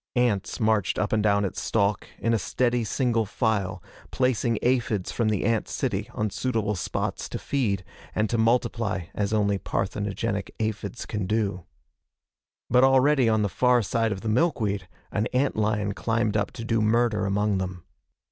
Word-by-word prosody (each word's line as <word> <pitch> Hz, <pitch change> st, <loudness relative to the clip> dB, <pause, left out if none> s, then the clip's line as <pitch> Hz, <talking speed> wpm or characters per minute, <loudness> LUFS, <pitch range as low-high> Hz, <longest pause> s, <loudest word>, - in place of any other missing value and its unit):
Ants 120 Hz, -6 st, +1 dB
marched 110 Hz, -4 st, +2 dB
up 105 Hz, -, 0 dB
and 110 Hz, -, +3 dB
down 100 Hz, -1 st, +3 dB
its 95 Hz, -, -4 dB
stalk 100 Hz, -2 st, 0 dB
in 115 Hz, -, 0 dB
a 115 Hz, -, +2 dB
steady, 120 Hz, +1 st, 0 dB
single 115 Hz, -1 st, 0 dB
file, 100 Hz, -5 st, -1 dB, 0.3 s
placing 120 Hz, -3 st, +1 dB
aphids 120 Hz, -6 st, +1 dB
from 115 Hz, -2 st, 0 dB
the 105 Hz, -3 st, 0 dB
ant 115 Hz, -2 st, +1 dB
city -, -, -2 dB
on 105 Hz, -1 st, -1 dB
suitable 110 Hz, 0 st, -1 dB
spots 90 Hz, -, -3 dB
to -, -, -4 dB
feed, 105 Hz, -9 st, -1 dB, 0.3 s
and 110 Hz, -, +2 dB
to 120 Hz, -, -1 dB
multiply 115 Hz, -5 st, +1 dB
as 105 Hz, 0 st, -1 dB
only 100 Hz, -2 st, +1 dB
parthenogenic 100 Hz, +1 st, -2 dB
aphids 110 Hz, +1 st, -3 dB
can 105 Hz, -4 st, -3 dB
do. 100 Hz, -4 st, -1 dB, 1.0 s
But 125 Hz, +2 st, +4 dB
already 135 Hz, -1 st, +5 dB
on 110 Hz, -1 st, +2 dB
the -, -, +2 dB
far 125 Hz, +5 st, +3 dB
side 115 Hz, +4 st, 0 dB
of 95 Hz, -2 st, -3 dB
the 110 Hz, -, -5 dB
milkweed, 110 Hz, -, +1 dB, 0.2 s
an 110 Hz, +2 st, 0 dB
ant 135 Hz, +2 st, +1 dB
lion 105 Hz, -1 st, 0 dB
climbed 115 Hz, 0 st, 0 dB
up 105 Hz, -1 st, +1 dB
to 115 Hz, -, -6 dB
do 115 Hz, -1 st, +1 dB
murder 110 Hz, -2 st, +2 dB
among 100 Hz, 0 st, +1 dB
them. 90 Hz, -2 st, -5 dB
110 Hz, 165 wpm, -26 LUFS, 100-115 Hz, 1.0 s, already